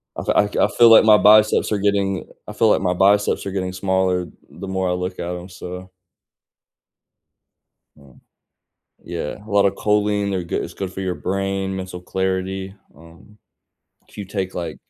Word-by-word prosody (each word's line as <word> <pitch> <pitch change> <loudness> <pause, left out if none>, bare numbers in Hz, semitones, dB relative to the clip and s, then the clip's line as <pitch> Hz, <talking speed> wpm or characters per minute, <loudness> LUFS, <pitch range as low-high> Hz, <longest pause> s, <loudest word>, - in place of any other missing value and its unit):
Also, - - -2
I 105 - +4
c 105 - -4
I - - +4
feel 115 +3 +5
like 115 -1 +7
my 105 -1 +7
biceps 110 +1 +4
are 105 - +1
getting 100 -1 0 0.2
I 105 - -7
feel 110 +1 +2
like - - +2
my 90 -2 0
biceps 100 +3 +2
are 100 - -4
getting 95 -1 -3
smaller 95 -1 0 0.2
the 100 - -9
more 95 -1 -1
I - - 0
look 90 +1 -4
at 85 - -4
'em, 90 +2 -9
so 90 0 -9 2.1
Mm, 70 -4 -20 0.9
yeah, 85 -3 -5
a - - -12
lot 100 -1 +4
of 100 - 0
choline, 105 -1 0
they're 95 -3 -2
goo - - -3
it's - - -8
good 95 -1 -5
for 95 - -7
your 95 -2 -2
brain, 95 +1 -3
mental 95 -1 -7
clarity, 95 +1 -3 0.2
um, 85 +7 -18 0.7
if - - -19
you 100 - -4
take, 95 -1 -4
like 85 -3 -5
95 Hz, 180 wpm, -20 LUFS, 90-100 Hz, 2.1 s, like